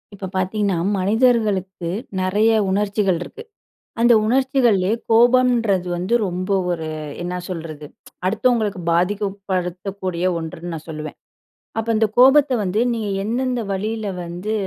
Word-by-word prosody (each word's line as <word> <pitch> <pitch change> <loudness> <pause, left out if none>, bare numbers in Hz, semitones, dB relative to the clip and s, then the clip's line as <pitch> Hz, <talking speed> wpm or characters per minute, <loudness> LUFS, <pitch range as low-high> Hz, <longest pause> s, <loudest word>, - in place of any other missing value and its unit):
இப்ப 190 -1 -6
பாத்தீங்கன்னா, 190 0 0 0.2
மனிதர்களுக்கு 205 -4 +1 0.3
நெறைய 205 +4 +2 0.2
உணர்ச்சிகள் 200 -2 +1
இருக்கு. 445 - -8 0.6
அந்த 240 0 +6
உணர்ச்சிகள்லயே, 240 -6 +2 0.2
கோபம்ன்றது 235 -5 +4
வந்து 185 +6 -2
ரொம்ப 185 +2 -4 0.2
ஒரு 160 -2 -3 0.4
என்ன 180 +1 -3
சொல்றது? 160 -4 -6 0.4
அடுத்தவங்களுக்கு 215 -1 +1
பாதிக்கப்படுத்தக்கூடிய 185 -1 -2
ஒன்றுன்னு 165 +1 -6
நான் 160 0 -8
சொல்லுவேன். 155 -1 -6 0.6
அப்ப 225 +1 -3
இந்த 220 0 +3
கோபத்த 270 +2 +6
வந்து, 195 +3 0
நீ 225 - -3 0.2
எந்தெந்த 245 +2 -1
வழியில 210 +1 -3
வந்து 175 +5 -5
200 Hz, 110 wpm, -21 LUFS, 180-225 Hz, 0.6 s, அந்த